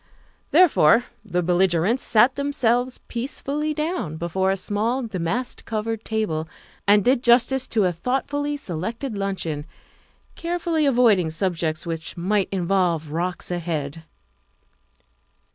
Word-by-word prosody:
Therefore 245 - +5 0.2
the 180 -4 -1
belligerents 180 +5 +2
sat 240 +4 +4
them 280 0 -2
selves 245 -1 +1
peacefully 280 +5 -3
down 305 - -2
before 175 +3 0
a 195 - +1
small, 225 +7 -1
damask 220 +4 -3
covered 225 0 -3
table 170 -8 -2 0.4
and 205 -1 +5
did 255 0 +3
justice 250 +2 +3
to 215 -4 +1
a 180 - +2
thoughtfully 285 - -2
selected 225 - -4
luncheon, 190 -7 -3 0.7
carefully 335 -3 -1
avoiding 230 -10 +4
subjects 160 -2 -2
which 165 +1 -5
might 195 +3 0
involve 175 -4 0
rocks 175 +3 -2
ahead. 165 -3 -3
205 Hz, 115 wpm, -23 LUFS, 170-255 Hz, 0.7 s, Therefore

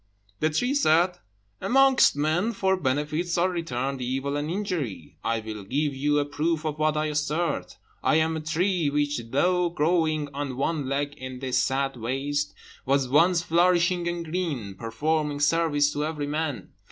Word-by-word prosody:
The 155 - +2
tree 245 - 0
said, 180 - +3 0.4
"Amongst 270 - +5
men, 160 +10 +1
for 190 -2 +1
benefits 155 +3 -1
are 180 +2 +2
returned 135 -6 -3
evil 135 +3 -2
and 145 +1 -2
injury. 160 - -4
I 115 -1 0
will 110 -2 -7
give 140 +7 -1
you 145 +2 +1
a 145 - +2
proof 155 +2 -1
of 155 -1 -3
what 155 0 +2
I 155 - +1
assert. 150 +3 -2 0.3
I - - +3
am 160 +1 +2
a - - -2
tree 165 +1 0
which, 145 -1 0
though 180 +6 +2
growing 155 -2 +1
on 140 -2 -4
one 140 -1 -1
leg 140 +1 -1
in 130 0 -6
this 130 -1 0
sad 135 0 0
waste, 140 +5 -2 0.3
was 135 0 +1
once 170 +5 +4
flourishing 175 +1 +2
and 175 -1 -3
green, 155 - -3
performing 145 +8 -1
service 145 -1 +2
to 145 - -1
every 150 -2 -3
one. 145 - -3
150 Hz, 165 wpm, -26 LUFS, 140-170 Hz, 0.4 s, Amongst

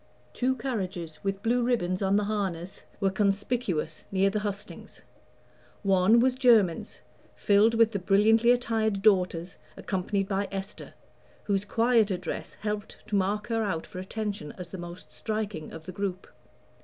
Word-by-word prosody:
Two 260 +1 +1
carriages, 190 - -4
with 195 0 -2
blue 240 +2 +2
ribbons 210 -7 0
on 195 0 +2
the 210 - +3
harness, 195 -4 -3 0.2
were 195 -1 +2
conspicuous 195 -4 -1
near 195 0 +3
the 210 - 0
hustings. 205 -1 -6 0.8
One 195 +3 +5
was 255 +2 +4
Jermyn's, 230 -9 +3 0.3
filled 210 +3 +4
with 225 -1 +4
the 200 - -2
brilliantly 215 +5 +4
attired 225 -4 +1
daughters, 180 -4 +2 0.2
accompanied 195 +1 -1
by 200 0 -1
Esther, 195 +1 -7 0.5
whose 200 -1 0
quieter 225 -3 +2
dress - - -6
helped 210 -1 -4
to 210 - 0
mark 200 +2 0
her 225 -1 +1
out 175 -6 -2
for 185 - -8
attention 200 -4 -4
as 180 -2 -7
the 190 - -7
most 175 +1 -9
striking 215 -7 -4
of 160 -1 -10
the 185 - -6
group. 190 0 -3
200 Hz, 150 wpm, -28 LUFS, 185-220 Hz, 0.8 s, One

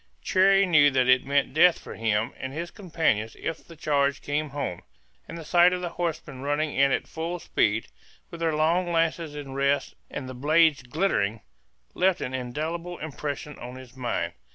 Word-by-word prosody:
Cherrie 195 +1 +4
knew 150 -5 +6
that 130 -2 +2
it 130 +1 +4
meant 140 -1 +1
death 170 +3 +6
for - - -10
him 110 0 0
and 130 - -5
his 165 +4 -5
companions 160 - -1
if 165 - -4
the 165 - -14
charge 145 -2 0
came 150 +1 -1
home; 135 -11 -4 0.5
and 165 - -7
the 165 - -8
sight 175 +2 +5
of 180 - -2
the 175 - -3
horsemen 160 -6 -4
running 145 +2 -1
in 140 0 +4
at - - 0
full 165 +2 -4
speed, 110 -9 0 0.5
with 170 - -8
their 165 -2 0
long 170 +3 +2
lances 165 -2 0
in 140 -2 -7
rest 140 +1 0 0.2
and 130 - -6
the 130 - -6
blades 155 +3 +3
glittering, 120 - 0 0.5
left 185 0 +2
an 125 - -4
indelible 160 +8 -4
impression 150 -1 -5
on 125 +1 -8
his 130 -1 -12
mind. 125 -2 -2
150 Hz, 180 wpm, -26 LUFS, 130-170 Hz, 0.5 s, knew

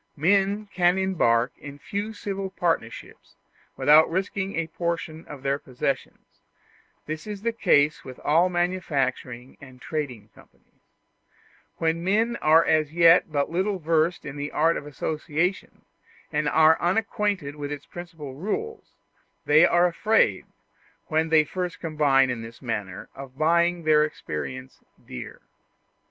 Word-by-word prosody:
Men 200 +6 +2
can 180 0 +3
embark 140 -11 +1
in 145 -1 -10
few 205 +8 -4
civil 195 -2 -5
partnerships 165 -11 -4 0.4
without 155 +2 +6
risking 190 +2 -2
a 165 - -1
portion 165 -1 -4
of 140 -3 -10
their 140 +1 0
possessions; 130 +1 -5 0.6
this 155 +4 -6
is 205 -1 -7
the 230 0 0
case 150 -9 +2
with 130 -1 -10
all 165 +5 +3
manufacturing 140 -8 -2
and 130 -2 -13
trading 125 -9 -5
companies. - - -23 1.0
When 165 +1 -1
men 220 +5 +1
are 160 +2 +4
as 155 -2 +2
yet 170 0 +5
but 145 0 -1
little 190 +3 0
versed 165 +1 0
in 145 0 -7
the 145 +1 -4
art 165 +2 +2
of 145 - -6
association, 155 +5 -3 0.5
and 150 -1 0
are 160 +1 +4
unacquainted 195 -5 -1
with 145 -1 -6
its 145 -1 -6
principal 165 -6 -9
rules, 305 - -5 0.5
they 155 +3 +6
are 175 +1 +3
afraid, 175 - +1 0.6
when 160 +1 +1 0.2
first 180 +3 -4
they - - -34
combine 145 -6 +2
in 120 -2 -4
this 115 +1 -10
manner, 105 -7 -5
of 135 -1 -11
buying 170 +2 +2
their 155 -1 +4
experience 130 - -6 0.3
dear. 60 - -9
160 Hz, 135 wpm, -25 LUFS, 140-180 Hz, 1.0 s, without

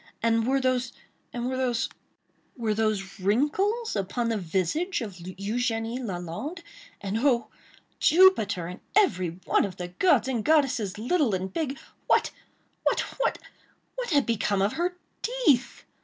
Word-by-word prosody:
And 230 0 +2
were 270 +1 +3
those—and 250 -1 -3
were 260 - -1
those—were 240 -2 -4
those 210 -3 -1
wrinkles, 300 - +1
upon 215 +4 -1
the 225 - 0
visage 190 - -1
of 220 -3 -4
Eugénie 225 +6 -2
Lalande? 190 - -5 0.4
And 200 +2 -2
oh! 250 -2 +2 0.5
Jupiter, 225 - +5
and 180 +2 -7 0.2
every 185 - +2
one - - +3
of 195 -3 -4
the 180 -1 -5
gods 265 - +3
and 240 -5 -1
goddesses, 265 -10 +2
little 245 - +1
and 190 0 -4
big!—what—what—what—what 330 - -3
had 285 -4 +3
become 205 -3 +1
of 200 - +1
her 355 +2 -1 0.2
teeth? 470 - +1
235 Hz, 120 wpm, -27 LUFS, 200-290 Hz, 0.5 s, Jupiter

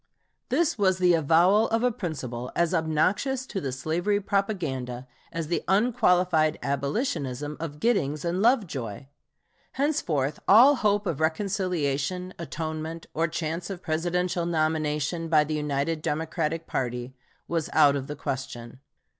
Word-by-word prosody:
This 330 -9 +1
was 190 -2 +3
the 180 -1 +4
avowal 170 +7 +4
of 225 +1 +1
a 250 - +3
principle 130 - -5
as 170 +1 +1
obnoxious 180 - +1
to 195 -6 -4
the 135 - -3
slavery 165 +10 0
propaganda 155 - -2 0.2
as 165 -1 -3
the 170 +3 -1
unqualified 180 -6 +3
abolitionism 140 - -2
of 150 -2 -6
Giddings 155 - 0
and 175 +3 0
Lovejoy. 155 - 0 0.7
Henceforth 165 - 0
all 255 +8 +7
hope 205 -2 +1
of 165 -7 -2
reconciliation, 180 -1 -1
atonement, 160 0 -5
or 165 +1 +1
chance 165 +2 -3
of 190 -2 -6
Presidential 175 +2 -1
nomination 155 0 0
by 155 -2 +5
the 155 +1 -4
united 150 +1 -1
Democratic 160 +1 -2
party 125 0 -3 0.3
was 165 -2 -1
out 145 -3 +5
of 135 -1 -3
the 150 - -5
question. 130 -3 -5
165 Hz, 130 wpm, -26 LUFS, 145-185 Hz, 0.7 s, all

